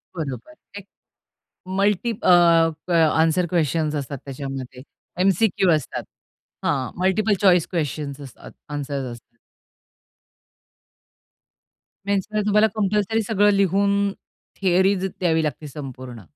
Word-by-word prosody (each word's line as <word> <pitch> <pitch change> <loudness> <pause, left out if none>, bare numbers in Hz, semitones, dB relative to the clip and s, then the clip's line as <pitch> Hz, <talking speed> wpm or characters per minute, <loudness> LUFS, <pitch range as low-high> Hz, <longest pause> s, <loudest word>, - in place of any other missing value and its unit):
बरोबर. 155 - -6 0.3
एक 195 - -15 0.9
मल्टी 205 +3 +1
अ, 225 - -4 0.7
क - - -4 0.3
आन्सर 165 +2 +2
क्वेशन्स 155 -1 0
असतात 140 -1 -4
त्याच्यामध्ये. 135 -2 -7 0.4
एम-सी-क्यू 195 0 +2
असतात. 150 -5 -4 0.6
हां, 130 -4 0
मल्टिपल 190 +3 +2
चॉईस 180 -4 +4
क्वेशन्स 145 -3 -3
असतात 135 -3 -12 0.2
आन्सर्स 140 -2 -3
असतात. 120 0 -14 2.7
मेन्समध्ये 200 +1 -1
तुम्हाला 210 +1 +4
कंपल्सरी 210 +1 0
सगळं 205 -1 +3
लिहून 200 +1 +2 0.5
थियरीज 190 +1 +2
द्यावी 170 -4 0
लागते 150 0 -4
संपूर्ण. 130 -5 -9
175 Hz, 100 wpm, -22 LUFS, 140-200 Hz, 2.7 s, चॉईस